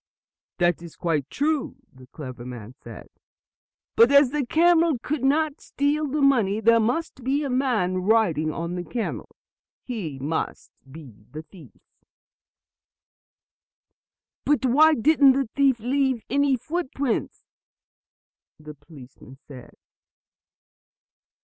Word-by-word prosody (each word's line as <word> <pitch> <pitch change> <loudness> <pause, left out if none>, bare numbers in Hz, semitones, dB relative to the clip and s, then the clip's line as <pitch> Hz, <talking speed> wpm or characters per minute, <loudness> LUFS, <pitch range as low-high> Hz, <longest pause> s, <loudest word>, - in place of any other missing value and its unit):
"That 175 -2 +1
is 170 -2 -11
quite 155 -5 -2
true," 295 0 -1 0.2
the 130 -1 -16
clever 130 -3 -9
man 120 -2 -9
said. 115 -3 -12 0.9
"But 230 +3 +5
as 280 -2 +5
the 295 -1 -1
camel 330 +2 +3
could 280 +3 -4
not 295 +2 0
steal 295 +2 -1
the 290 +1 -1
money, 225 -7 +2
there 230 +1 +4
must 250 +4 -2
be 275 +4 0
a 275 - -3
man 235 -9 0
riding 180 -6 +1
on 170 +2 -5
the 180 0 -4
camel. 230 +5 -5 0.5
He 195 - -6
must 145 +5 -4 0.2
be 130 -9 -14
the 155 +1 -9
thief." 175 0 -17 2.7
"But 290 -2 +1
why 305 +5 +5
didn't 280 +1 +4
the 270 -1 -1
thief 275 -4 +2
leave 260 0 -1
any 280 -1 +2
footprints?" 280 -3 -3 1.2
the 150 0 -11
policemen 135 -3 -16
asked. 125 -3 -12
235 Hz, 120 wpm, -24 LUFS, -, 2.7 s, But